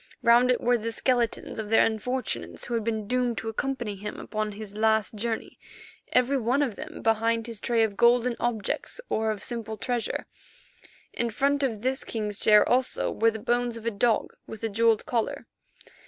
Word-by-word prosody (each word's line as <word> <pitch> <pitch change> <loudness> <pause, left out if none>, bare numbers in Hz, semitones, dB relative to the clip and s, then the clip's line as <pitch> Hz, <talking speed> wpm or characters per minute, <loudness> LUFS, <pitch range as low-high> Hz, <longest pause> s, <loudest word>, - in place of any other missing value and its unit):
Round 240 +2 +6
it 250 - +3
were 245 0 +2
the 230 +1 -3
skeletons 240 -1 0
of 215 -1 -4
the 225 - +5
unfortunates 220 - -1
who 240 - -5
had 230 -2 0
been 220 -1 -2
doomed 245 -1 0
to 225 - -3
accompany 240 -2 -3
him 205 +2 -7
upon 215 -1 -3
his 205 -1 -8
last 220 -1 +2
journey, 220 +1 -4 0.5
every 255 +2 +3
one 250 +5 +2
of 255 -6 -1
them - - -8
behind 225 0 +2
his 230 -3 -5
tray 230 -1 +2
of 205 -3 -1
golden 240 0 +4
objects, 235 - -2
or 220 0 0
of 210 -2 -3
simple 225 -2 -5
treasure. 245 -1 -2 0.9
In 235 - -1
front 280 +5 +1
of 230 -6 -1
this 260 +1 0
king's 210 -2 -3
chair 210 -1 +6
also 255 +1 +1
were 230 - +3
the 220 - -4
bones 240 +2 0
of 230 - -10
a 230 - +1
dog 225 +1 +1
with 220 0 -9
a 225 - 0
jewelled 225 +1 +2
collar. 230 -3 -2
230 Hz, 185 wpm, -27 LUFS, 220-245 Hz, 0.9 s, Round